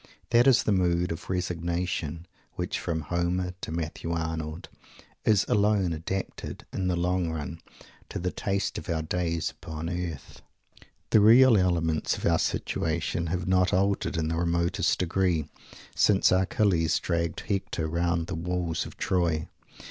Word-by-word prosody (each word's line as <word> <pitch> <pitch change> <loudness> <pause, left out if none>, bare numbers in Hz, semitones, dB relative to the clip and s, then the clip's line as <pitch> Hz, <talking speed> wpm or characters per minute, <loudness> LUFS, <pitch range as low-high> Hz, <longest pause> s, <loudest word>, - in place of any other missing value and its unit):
This 120 +2 +5
is 130 -5 +5
that - - +1
mood 90 -2 +2
of 80 - -6
"resignation," 85 -2 -2 0.3
which, - - -3
from 80 -2 -2
Homer 90 +2 -1
to - - -5
Matthew 80 0 -4
Arnold, 80 -1 -3 0.6
is 105 -2 +4
alone 100 -4 +2
adapted, 90 +5 -5
in 95 -1 -1
the 90 - +1
long 90 0 0
run, 80 +1 -5 0.5
to - - -5
the 90 +1 -2
taste 100 0 -2
of - - -11
our 80 -2 0
days 85 0 -1
upon 80 -1 -6
earth. 85 -6 -5 0.7
The 110 - +7
real 120 +3 +7
elements 85 -4 +1
of - - -5
our - - +3
situation 85 +1 -1
have 90 +2 -2
not 90 0 +3
altered 100 -2 +1
in 80 -1 0
the 80 - -1
remotest 85 0 +1
degree 90 -3 +1 0.5
since 100 -2 +4
Achilles 95 -3 +2
dragged 85 -1 -1
Hector 95 -5 -2
round 85 +1 0
the 95 - -5
walls 85 0 -2
of - - -13
Troy. 85 -4 0
85 Hz, 150 wpm, -27 LUFS, 80-95 Hz, 0.7 s, The